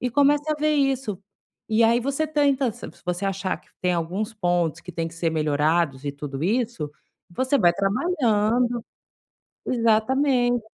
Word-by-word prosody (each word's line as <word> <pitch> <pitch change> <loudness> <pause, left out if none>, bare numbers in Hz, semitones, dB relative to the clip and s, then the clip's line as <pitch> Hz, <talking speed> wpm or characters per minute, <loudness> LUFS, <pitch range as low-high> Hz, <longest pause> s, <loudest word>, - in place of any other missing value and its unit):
e 250 - 0
comece 285 +3 +3
a - - +2
ver 305 0 +1
isso. 270 -8 0 0.5
E 220 +1 +3
aí, 235 +2 +4
você 275 +5 -1
tenta 280 -5 +1
se - - -9 0.2
você 180 +2 -2
achar 195 -1 -2
que - - -29
tem 180 0 +1
alguns 180 +6 -2
pontos 175 -4 0
que 180 - -9
têm 165 0 -2
que 165 - -15
ser 165 0 -1
melhorados 150 -1 +1
e - - 0
tudo 145 0 -6
isso, 225 - -1 0.4
você 260 +9 +1
vai 175 - +5
trabalhando 235 - +1 0.8
Exatamente. 245 +1 +2
220 Hz, 155 wpm, -24 LUFS, 175-260 Hz, 0.8 s, vai